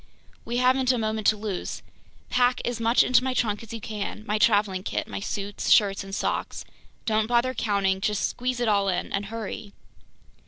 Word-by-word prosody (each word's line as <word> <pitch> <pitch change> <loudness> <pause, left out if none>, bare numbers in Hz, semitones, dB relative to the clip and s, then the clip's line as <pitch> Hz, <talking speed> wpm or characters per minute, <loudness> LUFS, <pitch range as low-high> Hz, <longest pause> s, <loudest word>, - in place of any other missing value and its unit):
"We 240 +1 -2
haven't 255 +1 +3
a 250 - 0
moment 220 -1 -1
to 215 - +4
lose. 205 -3 -4 0.5
Pack 250 0 +3
as 240 -1 -2
much 230 +1 +4
into 255 0 +4
my 260 -1 -1
trunk 210 -4 0
as 230 - -11
you 230 - -5
can, 215 -1 -5
my 210 -1 0
traveling 205 -3 +3
kit, - - -3
my - - -5
suits, 200 0 -4
shirts, 200 -3 +4
and 195 0 -6
socks, - - -2 0.4
don't 215 -1 +1
bother 240 +2 +2
counting, 195 -5 0
just 210 -1 +1
squeeze 250 0 -3
it 240 - 0
all 200 -2 +2
in—and 195 +2 -2
hurry!" 215 -1 -6
215 Hz, 185 wpm, -26 LUFS, 200-240 Hz, 0.5 s, to